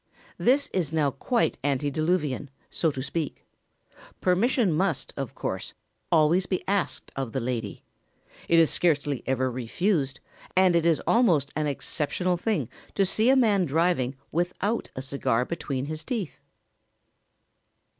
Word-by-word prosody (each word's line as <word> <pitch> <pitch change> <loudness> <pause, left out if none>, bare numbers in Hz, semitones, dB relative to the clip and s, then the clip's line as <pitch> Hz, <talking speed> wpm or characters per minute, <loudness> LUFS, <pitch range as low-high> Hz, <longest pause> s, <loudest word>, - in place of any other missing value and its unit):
This 275 +4 +3
is 175 -6 0
now 150 -3 +2
quite 235 - 0
antediluvian, 145 +1 0 0.2
so 165 - +1
to 135 -3 -4
speak. 145 +2 -4 0.7
Permission 195 - +2
must, 165 -3 0
of 135 -4 -5
course, 95 - -4 0.4
always 170 +3 +4
be 185 - -2
asked 200 -1 -1
of 135 -4 -4
the 135 - 0
lady. 115 -5 -4 0.7
It 170 - +5
is 165 -2 +5
scarcely 145 -5 +1
ever 130 -1 +1
refused, 135 - -1 0.4
and 185 -2 +5
it 170 0 +3
is 165 -2 +2
almost 165 - +3
an 155 -1 0
exceptional 155 +5 -1
thing 215 +5 -1 0.3
to 195 - +3
see 215 +5 +2
a 265 - +6
man 210 -8 +3
driving 155 -4 +1 0.2
without 180 +6 -1
a 130 - -4
cigar 130 -3 0
between 135 -5 -3
his 155 +1 -5
teeth. 210 - -4
160 Hz, 135 wpm, -26 LUFS, 135-185 Hz, 0.7 s, a